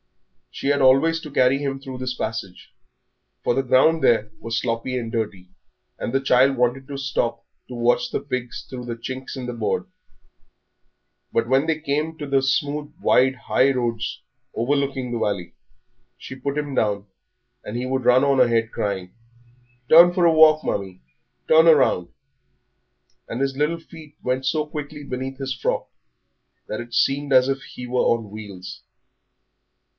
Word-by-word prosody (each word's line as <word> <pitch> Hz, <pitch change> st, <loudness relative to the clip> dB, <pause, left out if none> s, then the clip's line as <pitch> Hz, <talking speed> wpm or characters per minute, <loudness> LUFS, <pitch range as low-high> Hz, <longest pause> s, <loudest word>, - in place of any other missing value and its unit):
She -, -, -6 dB
had 145 Hz, 0 st, +2 dB
always 135 Hz, +5 st, +4 dB
to 150 Hz, -, -9 dB
carry 130 Hz, 0 st, +3 dB
him 135 Hz, -1 st, -3 dB
through 130 Hz, -2 st, -8 dB
this 130 Hz, 0 st, -2 dB
passage, 110 Hz, -6 st, -5 dB, 0.7 s
for -, -, +2 dB
the 135 Hz, -, 0 dB
ground 135 Hz, +6 st, +3 dB
there 110 Hz, -2 st, +3 dB
was 115 Hz, 0 st, -2 dB
sloppy 120 Hz, +2 st, -2 dB
and 115 Hz, -2 st, -4 dB
dirty, 105 Hz, -5 st, -3 dB, 0.5 s
and -, -, -4 dB
the 135 Hz, -, +2 dB
child 135 Hz, 0 st, +3 dB
wanted 125 Hz, +2 st, 0 dB
to 140 Hz, -, -6 dB
stop 120 Hz, -4 st, -2 dB, 0.2 s
to 130 Hz, -, -9 dB
watch 120 Hz, +1 st, +1 dB
the -, -, -1 dB
pigs 130 Hz, -3 st, -5 dB
through 125 Hz, -2 st, -7 dB
the 120 Hz, -1 st, -4 dB
chinks 130 Hz, +3 st, -7 dB
in 130 Hz, -, -5 dB
the 125 Hz, -, -4 dB
boards. 115 Hz, -, -2 dB, 1.4 s
But 115 Hz, 0 st, 0 dB
when 135 Hz, +5 st, +2 dB
they 160 Hz, -1 st, 0 dB
came 155 Hz, +2 st, -2 dB
to 145 Hz, -, -6 dB
the 135 Hz, -1 st, +2 dB
smooth, 145 Hz, +2 st, -1 dB
wide, 130 Hz, -7 st, +3 dB
high 130 Hz, +2 st, +2 dB
roads 120 Hz, -3 st, -2 dB, 0.3 s
overlooking 135 Hz, +1 st, -1 dB
the 120 Hz, -, -2 dB
valley, 100 Hz, -5 st, -2 dB, 0.6 s
she 130 Hz, -, -9 dB
put 140 Hz, +2 st, -4 dB
him 145 Hz, -2 st, -3 dB
down, 100 Hz, -3 st, 0 dB, 0.6 s
and 110 Hz, -, -5 dB
he 125 Hz, -, -3 dB
would 130 Hz, 0 st, -1 dB
run 125 Hz, +2 st, +5 dB
on 140 Hz, -1 st, +3 dB
ahead, 115 Hz, -2 st, +3 dB
crying, 95 Hz, -3 st, -3 dB, 0.7 s
"Turn 170 Hz, +4 st, +8 dB
for 180 Hz, -1 st, +2 dB
a 165 Hz, -, +5 dB
walk, 155 Hz, -1 st, +6 dB
Mummie, 95 Hz, -2 st, -3 dB, 0.5 s
turn 160 Hz, +1 st, +6 dB
along," 130 Hz, -, +4 dB, 1.2 s
and 115 Hz, -, -5 dB
his 135 Hz, 0 st, -1 dB
little 150 Hz, +4 st, 0 dB
feet 160 Hz, -2 st, -14 dB
went 130 Hz, +1 st, -1 dB
so 150 Hz, +3 st, 0 dB
quickly 150 Hz, 0 st, -7 dB
beneath 130 Hz, 0 st, -5 dB
his 135 Hz, -1 st, -3 dB
frock 130 Hz, -, -2 dB, 0.8 s
that 110 Hz, -, -4 dB
it 120 Hz, 0 st, -11 dB
seemed 140 Hz, +1 st, +1 dB
as 130 Hz, -1 st, +5 dB
if 135 Hz, 0 st, -1 dB
he 125 Hz, -, -9 dB
were 125 Hz, 0 st, +1 dB
on 115 Hz, -3 st, 0 dB
wheels. 100 Hz, -4 st, -9 dB
130 Hz, 165 wpm, -22 LUFS, 115-140 Hz, 1.4 s, Turn